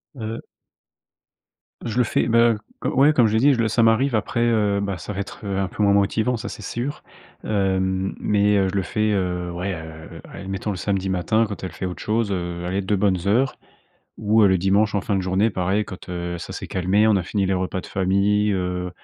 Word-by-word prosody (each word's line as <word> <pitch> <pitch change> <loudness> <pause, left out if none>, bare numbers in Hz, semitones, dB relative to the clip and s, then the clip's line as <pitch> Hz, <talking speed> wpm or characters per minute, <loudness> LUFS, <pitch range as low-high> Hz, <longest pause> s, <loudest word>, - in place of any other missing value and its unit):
Heu 115 -2 -5 1.4
je 115 -1 -3
le 125 - +5
fais, - - 0
ben, 115 +1 +5 0.3
heu, - - +2
co 140 +4 +5
comme 120 -5 +4
je 105 - -1
l'ai 110 - +3
dit, 140 +4 +5
je 120 - -2
le 115 - +2
ça 115 +2 +2
m'arrive 115 +3 +3
après, 110 +2 -1
heu, 105 -4 +2
bah, 100 -2 -2
ça 90 - -7
va 100 - -5
être, 100 - -6
heu, 100 -1 -2
un 95 -1 0
peu 105 - -3
moins 100 - +4
motivant, 110 +5 +1
ça, 115 +1 -6
c'est - - -7
sûr, 120 +7 -4 0.4
hem. 95 -2 0
Mais 105 0 +2
heu, 95 -1 +2
je 95 - -5
le 95 - +1
fais, 110 +3 0
heu, 90 -3 -1
ouais, 90 +3 -3
heu, 80 -1 -9
allez, - - -9
admettons, 95 +2 -4
le 95 - -4
samedi 95 0 -1
matin 100 +5 +1
quand 100 - -7
elle 95 - -4
fait - - -5
autre 90 -1 -5
chose, 110 -1 0
heu, 85 -2 -3
allez 95 +3 -1
2 100 +2 0
bonnes 95 -2 +1
heures 125 +7 +2 0.6
ou 110 +1 +3
heu, 100 - +6
le 95 - +4
dimanche, 100 +3 +2
en 100 - +2
fin 100 - -1
de 95 - +1
journée, 95 +4 +1
pareil, 95 +2 0
quand, 95 -1 -10
heu, 85 -1 -4
ça - - -7
s'est - - -6
calmé, 95 +4 +2
on 110 - +4
a 95 - 0
fini 100 +3 -1
les 95 - +1
repas 95 0 -2
de - - -10
famille, 100 +2 +1
heu, 90 -1 -2
100 Hz, 235 wpm, -22 LUFS, 95-110 Hz, 1.4 s, heu